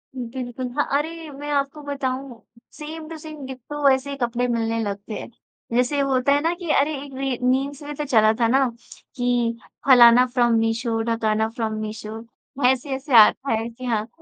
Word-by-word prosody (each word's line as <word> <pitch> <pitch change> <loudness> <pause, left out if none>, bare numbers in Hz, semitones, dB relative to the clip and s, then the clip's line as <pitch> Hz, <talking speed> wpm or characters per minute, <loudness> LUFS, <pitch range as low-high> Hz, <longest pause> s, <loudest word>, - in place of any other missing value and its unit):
बिल्कुल। 250 0 -5
हाँ, 290 - +3
अरे 325 +2 -5
मैं 290 +1 -7
आपको 280 +1 -1
बताऊँ 270 -3 -4 0.3
सेम 310 +1 -8
टू 325 - -7
सेम, 310 -2 -9
डिट्टो 275 +2 -1
ऐसे 265 +1 +1
ही 280 - -5
कपड़े 245 -1 -1
मिलने 230 -1 -1
लगते 200 +1 -5
हैं। - - -8 0.5
जैसे 250 +4 +2
होता 275 -1 +2
है 285 - +2
ना 330 +3 +1
कि 345 -2 -8
अरे 290 +3 +1
एक 280 - -11
री 270 -2 -1
मीम्स 270 +3 0
में 295 +1 -6
तो 295 - -3
चला 220 -5 +4
था 230 - +3
ना 265 +3 +3 0.5
कि 245 -2 0 0.3
फलाना 245 -1 +8
फ्रॉम 240 -2 +3
मीशो, 225 0 0
ढकाना 220 -1 0
फ्रॉम 225 -1 -3
मीशो। 215 0 -6 0.5
ऐसे-ऐसे 265 +1 -2
आ 215 - +10
रखा 275 +1 -3
है। 225 +1 0
जी 245 +2 -10
हाँ, 220 -3 -1
255 Hz, 180 wpm, -23 LUFS, 230-280 Hz, 0.5 s, आ